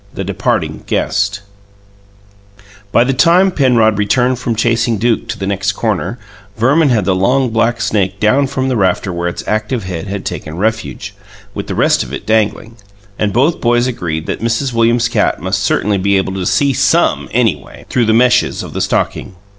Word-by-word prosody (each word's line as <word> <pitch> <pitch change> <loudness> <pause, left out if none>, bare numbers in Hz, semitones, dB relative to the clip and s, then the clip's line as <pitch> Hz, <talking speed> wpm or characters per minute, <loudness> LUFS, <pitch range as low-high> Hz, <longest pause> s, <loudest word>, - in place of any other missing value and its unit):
THE - - -5
DEPARTING - - -2
GUEST 100 -1 -1 1.5
By 115 - +4
the 135 +2 0
time 175 +8 +4
Penrod 120 - +2
returned 125 +4 +1
from 120 -2 -2
chasing 115 0 +1
Duke 115 +1 0
to 115 -1 -4
the 95 - -4
next 100 +1 -1
corner, 105 -1 -2 0.4
Verman 140 +7 +3
had 110 -6 +1
the 95 - +2
long, 125 +7 +1
black 115 +1 +1
snake 100 -3 -1
down 130 +6 +2
from 130 -1 -2
the 130 - 0
rafter 95 -2 0
where 85 0 -2
its 85 - -5
active 110 +2 -1
head 90 0 -5
had 100 0 -5
taken 75 +2 -5
refuge, 110 +3 -3 0.4
with - - -6
the - - -4
rest - - +2
of - - -6
it - - -6
dangling; 110 +1 0 0.4
and 105 -1 0
both 135 - +1
boys 120 0 +2
agreed 85 -11 -3
that - - -4
Mrs. 115 +3 -1
Williams's 115 +1 +2
cat 115 - 0
must - - -2
certainly 100 -1 0
be 100 +1 +2
able 95 0 -1
to 95 -2 -3
"see 140 -1 +2
SOME, - - +1
anyway", - - -1
through 120 -2 +1
the - - +3
meshes 120 +2 +2
of - - -9
the - - -3
stocking. 95 - -2
115 Hz, 185 wpm, -15 LUFS, 100-125 Hz, 1.5 s, By